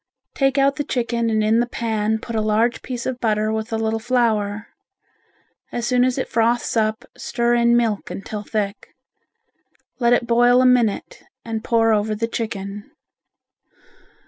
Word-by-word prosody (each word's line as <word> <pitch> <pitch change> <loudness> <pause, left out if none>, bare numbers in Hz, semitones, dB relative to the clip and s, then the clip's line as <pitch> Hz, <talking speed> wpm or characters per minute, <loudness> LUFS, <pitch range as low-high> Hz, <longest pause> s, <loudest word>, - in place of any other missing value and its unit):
Take 270 0 +1
out 275 0 +3
the 290 - -1
chicken 235 -3 -1
and 215 -1 +1
in 220 +2 +3
the 240 - +1
pan 220 -2 -1
put 230 +1 -7
a 220 - +1
large 215 +3 +1
piece 245 -2 -5
of 255 -1 -3
butter 215 -2 0
with 220 +1 -4
a 225 - 0
little 225 0 -1
flour. 220 -3 0 1.0
As 240 -1 -3
soon 250 0 +2
as 255 0 +1
it 260 - -2
froths 235 +1 0
up 220 -1 0
stir 240 0 -1
in 235 0 +4
milk 225 -4 -1
until 205 +2 -6
thick. 205 -1 -4 1.0
Let 240 -1 +3
it 245 - +2
boil 245 +1 +4
a 255 - +4
minute 250 - +1 0.2
and 225 -1 -4
pour 225 -1 +3
over 215 0 0
the 230 +2 -2
chicken. 205 -3 -5
230 Hz, 165 wpm, -21 LUFS, 215-240 Hz, 1.0 s, in